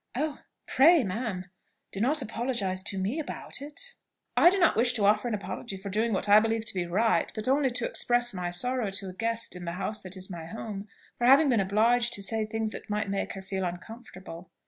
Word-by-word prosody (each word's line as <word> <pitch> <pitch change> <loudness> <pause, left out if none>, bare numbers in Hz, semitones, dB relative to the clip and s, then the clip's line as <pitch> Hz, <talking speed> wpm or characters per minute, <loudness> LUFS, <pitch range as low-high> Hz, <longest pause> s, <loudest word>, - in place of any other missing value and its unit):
"Oh! 295 +3 -2 0.3
pray, 320 +2 +5
ma'am, 195 -2 -3 0.5
do 195 - -6
not 270 +6 +2
apologise 230 -5 -1
to 195 0 -4
me 200 +11 -1
about 295 - -5
it." 300 +13 -5 0.4
"I 345 - +7
do 390 - +1
not 345 -4 +4
wish 240 +3 +3
to 210 -4 +1
offer 210 +4 +3
an 230 - -1
apology 200 0 -6
for 195 +1 -7
doing 220 +3 0
what 195 0 -1
I 205 +1 +8
believe 225 0 -1
to - - -2
be 180 -2 -2
right; 215 +6 +1
but 215 +1 -4
only 270 +1 +3
to 245 - -1
express 240 -1 +3
my 180 -2 -3
sorrow 240 +5 -1
to 195 0 -2
a - - -8
guest, 230 +2 -3
in 180 -1 -8
the 170 - -3
house 205 +4 -3
that 190 +1 -6
is 185 0 -6
my 170 -4 -8
home, 205 +1 -7 0.3
for 240 - +2
having 280 +3 +6
been 235 -4 +3
obliged 230 +5 +2
to 200 - -1
say 225 +3 -1
any 220 - 0
thing 225 +1 -2
that - - -9
might 210 0 -1
make 195 0 -2
her 195 - -8
feel 190 0 -3
uncomfortable." 185 -1 -8
215 Hz, 230 wpm, -28 LUFS, 190-245 Hz, 0.5 s, I